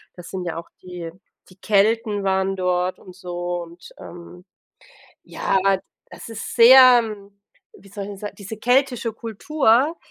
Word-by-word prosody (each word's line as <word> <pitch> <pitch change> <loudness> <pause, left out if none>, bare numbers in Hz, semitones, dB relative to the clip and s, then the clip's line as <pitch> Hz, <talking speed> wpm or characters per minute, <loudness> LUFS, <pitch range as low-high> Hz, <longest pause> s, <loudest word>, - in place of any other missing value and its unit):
das 175 -1 -11
sind 185 -1 -5
ja 165 -2 -4
auch 170 - -9
die 175 -2 -8 0.4
die 185 - -19
Kelten 215 +1 +1
waren 190 0 0
dort 180 0 -1
und 185 -1 -15
so 175 -1 -5
und, 170 +1 -13
ähm, 175 +1 -12 0.8
ja, 195 - -1 0.5
das - - -11
ist 225 -1 -7
sehr 250 +1 +8 0.7
wie 195 - -18
soll 200 0 -7
ich - - -8
'n 200 - -9
sa 205 +1 -6
diese 205 +2 -9
keltische 245 0 +1
Kultur, 250 +6 0
195 Hz, 150 wpm, -21 LUFS, 180-230 Hz, 0.8 s, sehr